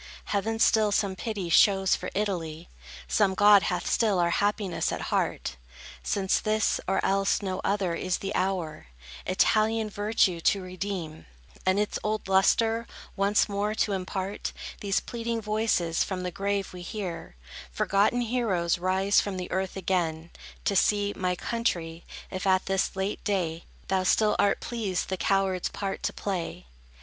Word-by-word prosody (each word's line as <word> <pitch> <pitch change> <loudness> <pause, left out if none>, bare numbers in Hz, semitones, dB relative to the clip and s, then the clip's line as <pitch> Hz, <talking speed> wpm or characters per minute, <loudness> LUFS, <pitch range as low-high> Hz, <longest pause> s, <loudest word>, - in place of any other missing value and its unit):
Heaven 215 +2 -1
still 220 -2 +4
some 200 -1 +1
pity 205 -3 -4
shows 190 +2 +5
for - - -5
Italy; 170 -6 -3 0.4
Some 190 - +2
god 205 0 +7
hath 180 - -2
still 215 -5 +2
our 170 -1 +2
happiness 205 -1 0
at - - -4
heart: 65 - -1 0.4
Since 190 - +1
this, 215 0 +1
or 195 - +1
else 195 +1 +1
no 185 -1 -2
other, 195 -3 0
is 180 +1 -1
the 195 +1 -4
hour, 180 - -2 0.4
Italian 215 +3 +2
virtue 205 -4 +1
to 200 - +3
redeem, 185 -3 -5 0.4
And 185 +1 +4
its 210 - -1
old 215 -1 -2
lustre 225 +4 +3 0.3
once 200 +1 +3
more 205 +1 -1
to 215 - +1
impart, 190 +1 -3 0.3
These 200 -1 0
pleading 235 -1 -3
voices 215 -6 +1
from 185 -2 -4
the 180 - -3
grave 200 +1 -2
we 180 - -8
hear; 175 - -6 0.4
Forgotten 200 - +2
heroes 215 -8 0
rise 190 +2 +3
from 195 -2 -4
earth 190 0 -2
again, 170 -3 -1 0.3
To 200 - +1
see, 205 +1 +2
my 180 -1 -1
country, 175 -7 -2 0.3
if 185 0 -3
at 185 0 +3
this 195 0 0
late 190 +2 -3
day, 170 -5 -1 0.2
Thou 190 -1 +1
still 210 +3 +3
art 200 0 +2
pleased 210 -7 -2
the 190 - -1
coward's 190 0 +1
part 195 -1 -4
to - - -1
play. 175 - -4
195 Hz, 150 wpm, -27 LUFS, 185-210 Hz, 0.4 s, god